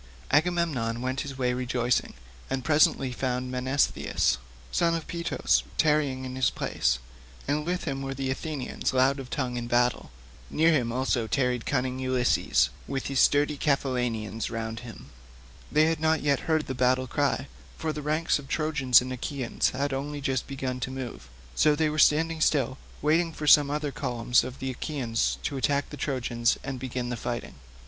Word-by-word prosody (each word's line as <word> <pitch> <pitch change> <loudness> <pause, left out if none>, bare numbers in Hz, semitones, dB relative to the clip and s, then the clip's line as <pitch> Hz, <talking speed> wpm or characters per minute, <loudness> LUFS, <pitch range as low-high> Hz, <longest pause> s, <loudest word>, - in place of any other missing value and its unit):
Agamemnon 150 -7 +1
went 130 +1 -1
his 135 -2 -6
way 125 -1 +1
rejoicing, 125 - 0 0.3
and 130 -1 -2
presently 150 -4 +3
found 125 0 -2
Menestheus, 130 - +1 0.3
son 170 -1 +2
of 165 - -4
Peteos, 170 0 0 0.2
tarrying 145 -4 +2
in 130 0 -6
his 130 0 +2
place, 65 0 0 0.5
and 150 +2 -1
with 180 +1 -1
him 135 -3 -3
were 135 0 -4
the 135 0 -2
Athenians 140 -1 -3
loud 135 +2 +3
of 130 -2 -7
tongue 125 -3 -2
in 120 -1 -4
battle. 120 0 +1 0.4
Near 160 +2 +3
him 120 -6 +1
also 125 -2 0
tarried 125 -2 0
cunning 130 -1 -1
Ulysses, 125 - +2 0.2
with 135 -1 -3
his 135 -2 0
sturdy 145 0 +3
Cephallenians 125 -6 -1
round 115 -1 -4
him; 120 -3 -11 0.6
they 155 +1 +5
had 160 -1 +1
not 160 -1 +1
yet 140 +1 0
heard 155 -1 +2
the 130 - -4
battle 130 +1 +2
cry, 140 +1 0 0.3
for 160 -1 -2
the 150 - -5
ranks 155 +2 +1
of 140 - -11
Trojans 140 -5 +3
and 130 0 -5
Achaeans 130 0 -1
had 140 +1 -2
only 145 +2 -3
just 135 -2 -1
begun 130 -2 -4
to 130 - -3
move, 125 - -7 0.2
so 150 - +4
they 155 0 +1
were 155 +1 -2
standing 160 +2 +3
still, 135 -4 +2 0.2
waiting 165 +3 +3
for 155 -1 -6
some 145 -1 +7
other 150 0 -2
columns 120 -1 +1
of 130 +1 -7
the 130 0 -3
Achaeans 125 -4 -1
to 140 - -2
attack 140 +1 0
the - - -6
Trojans 120 -5 0
and 135 -1 -4
begin 125 -1 -3
the 120 - -2
fighting. 120 +1 -4
135 Hz, 175 wpm, -27 LUFS, 125-150 Hz, 0.6 s, some